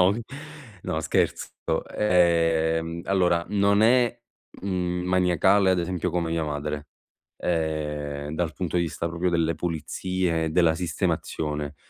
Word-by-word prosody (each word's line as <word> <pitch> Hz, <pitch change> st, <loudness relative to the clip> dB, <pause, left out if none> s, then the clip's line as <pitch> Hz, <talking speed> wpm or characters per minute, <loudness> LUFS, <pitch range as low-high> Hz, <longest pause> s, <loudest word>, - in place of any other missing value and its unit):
no, 90 Hz, +2 st, +5 dB, 0.7 s
no, 80 Hz, -, -2 dB
scherzo. -, -, 0 dB, 0.5 s
Ehm, 85 Hz, -3 st, +2 dB
allora 90 Hz, -3 st, +2 dB
non 100 Hz, 0 st, +3 dB
è, 120 Hz, +1 st, +4 dB, 0.5 s
mhmm, 90 Hz, -2 st, -1 dB
maniacale 90 Hz, +2 st, +3 dB
ad 90 Hz, -, +2 dB
esempio 90 Hz, 0 st, -2 dB
come 85 Hz, -1 st, -1 dB
mia 80 Hz, -1 st, 0 dB
madre, 75 Hz, 0 st, -4 dB, 0.5 s
ehm, 75 Hz, -3 st, -2 dB
dal 80 Hz, -2 st, -1 dB
punto 90 Hz, +1 st, -3 dB
di 85 Hz, -, +3 dB
vista 85 Hz, 0 st, -3 dB
proprio 85 Hz, +2 st, -1 dB
delle 85 Hz, -1 st, +1 dB
pulizie 85 Hz, +1 st, -2 dB
e -, -, -2 dB
della 85 Hz, -1 st, +3 dB
sistemazione, 75 Hz, -3 st, -2 dB
85 Hz, 125 wpm, -25 LUFS, 80-90 Hz, 0.7 s, no